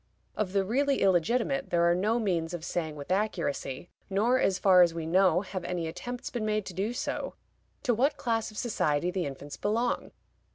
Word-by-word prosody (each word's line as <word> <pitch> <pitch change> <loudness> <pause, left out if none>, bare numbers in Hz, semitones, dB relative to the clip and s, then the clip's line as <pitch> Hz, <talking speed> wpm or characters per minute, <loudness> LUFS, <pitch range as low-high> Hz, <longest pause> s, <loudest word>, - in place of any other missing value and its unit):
Of 200 -3 -2
the 195 -1 +2
really 275 +6 +1
illegitimate, 235 - +2
there 170 -1 +2
are 170 0 +5
no 210 +6 +1
means 175 -7 -1
of 165 -1 -7
saying 160 -3 -2
with 145 +3 -7
accuracy 175 -7 -2 0.2
(nor, 225 +6 +2
as 190 -6 +2
far 185 -1 +6
as 170 -2 +4
we 165 -1 -3
know, 180 +1 +4
have 185 -2 -5
any 175 -2 -2
attempts 245 +9 -6
been 240 -3 -3
made 215 -1 0
to 185 - -7
do 195 +6 -1
so) 245 - -3 0.5
to 250 -4 +2
what 270 +6 +2
class 225 -2 -1
of 215 - -12
society 175 -7 0
the 180 -4 -1
infants 140 +1 -8
belong. 230 +4 0
190 Hz, 195 wpm, -29 LUFS, 170-225 Hz, 0.5 s, far